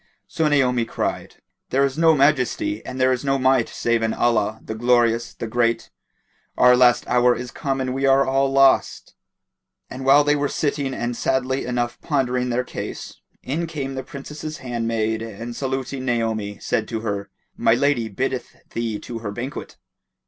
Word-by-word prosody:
So 160 - 0
Naomi 125 -5 +2
cried, - - -4 0.3
"There 135 +1 +3
is 135 -1 -2
no 160 0 +4
Majesty 150 - +1
and 130 - -7
there 130 0 +4
is 125 +1 -1
no 135 -1 +1
Might 130 -2 +2
save 120 -1 0
in 110 0 0
Allah, 110 -2 +1
the - - -4
Glorious, 120 0 +2
the - - -5
Great! 115 +1 0 0.7
Our 125 0 +6
last 125 -1 +4
hour 125 0 +4
is 125 0 -6
come 135 -3 -2
and 130 -1 -2
we 135 +1 0
are 135 0 +5
all 135 +1 +1
lost." 135 0 +3 0.8
And 130 +1 -6
while 140 +2 +6
they 145 0 +3
were 145 -1 0
sitting 140 -3 -1
and 120 0 -3
sadly 130 +2 0
enough 120 -1 -2
pondering 125 -4 0
their 125 +1 0
case, - - -7 0.2
in 165 +6 -2
came 140 -4 -4
the 130 - -4
Princess's 150 +3 -8
handmaid 115 -3 -2
and 115 +2 -7
saluting 135 0 -3
Naomi 110 -5 -1
said - - -1
to 115 -2 -4
her, 100 -2 -3 0.3
"My 115 - +3
lady 130 -4 +1
biddeth 130 +5 -3 0.2
thee 115 -2 -2
to 115 -1 -6
her 110 -2 -5
banquet." 120 +8 -6
125 Hz, 170 wpm, -22 LUFS, 115-135 Hz, 0.8 s, Our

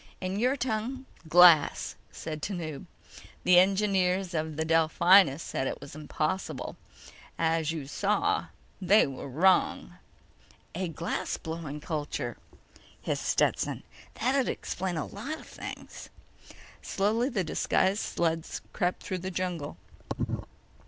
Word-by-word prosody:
"In 185 +2 -2
your 250 +4 +2
tongue—glass," 215 - +3 0.2
said 155 -1 -6
Tanub. 165 -7 -4 0.6
"The 180 -1 +7
engineers 190 -1 +2
of 155 -1 -2
the 160 +1 -1
Delphinus 165 0 +5
said 135 - -2
it - - -4
was 140 - -10
impossible. 155 +4 -3 0.6
As 160 -1 +1
you 160 -4 -4
saw—they 210 - +1
are 135 -1 -6
wrong." 175 +8 +2 0.8
"A 185 +2 -2
glass 165 +1 -3
blowing 160 -3 -6
culture," 145 -6 -3 0.6
hissed - - -3
Stetson. - - +1 0.3
"That'd 260 +2 +1
explain 185 -2 -3
a 155 - -2
lot 275 +11 -6
of - - -13
things." - - -9 0.7
Slowly, 220 +6 +1
the 210 -8 -1
disguised 190 +4 +1
sled 165 -1 0 0.3
crept 180 -3 -1
through 185 - -3
the 185 +2 -4
jungle. 175 - -3
180 Hz, 110 wpm, -29 LUFS, 160-200 Hz, 0.8 s, The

